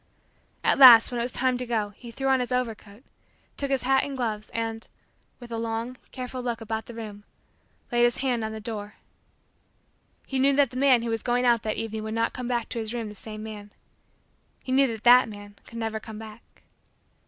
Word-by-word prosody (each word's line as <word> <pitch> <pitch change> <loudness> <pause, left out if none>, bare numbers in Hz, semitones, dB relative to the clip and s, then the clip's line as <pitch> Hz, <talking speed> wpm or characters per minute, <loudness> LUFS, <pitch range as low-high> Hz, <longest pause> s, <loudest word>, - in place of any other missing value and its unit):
At - - +3
last, 245 -4 +10
when 240 - -2
it - - +1
was 245 - -1
time 255 0 0
to 250 - -3
go, 220 -3 -1
he 235 +4 -13
threw 270 +4 -4
on 265 -1 +4
his 250 0 -3
overcoat, 225 -3 -3 0.5
took 280 - -3
his 270 -2 0
hat 265 +1 +3
and 275 -1 -4
gloves, 215 -4 -3
and, 225 -1 -4 0.5
with 240 -2 -11
a 230 - -3
long, 230 +2 -3 0.2
careful 255 0 -6
look 240 -2 -3
about 220 0 -4
the 235 - -9
room, 210 -3 -8 0.7
laid 240 0 +2
his 240 0 +3
hand 250 -4 -1
on 220 - -3
the 220 - -6
door. 210 -1 -5 1.3
He 270 - -2
knew 275 +1 +4
that 280 -3 +3
the - - -11
man 260 -3 +4
who 235 - -2
was 225 -1 -1
going 245 0 0
out 235 -2 +4
that 215 -1 -3
evening 220 -1 -4
would 220 +1 -4
not 230 0 0
come 250 -1 -5
hack 240 -2 -1
to 235 - -3
his 220 +1 -4
room 230 -3 -4
the - - -9
same 215 +1 -8
man. 210 -2 -9 0.9
He 255 - -5
knew 270 +1 +4
that 225 -3 -6
that 245 0 +7
man 205 -1 -11
could 230 - -10
never 225 -1 -3
come 220 -1 -10
back. 220 +1 -13
230 Hz, 220 wpm, -26 LUFS, 220-250 Hz, 1.3 s, last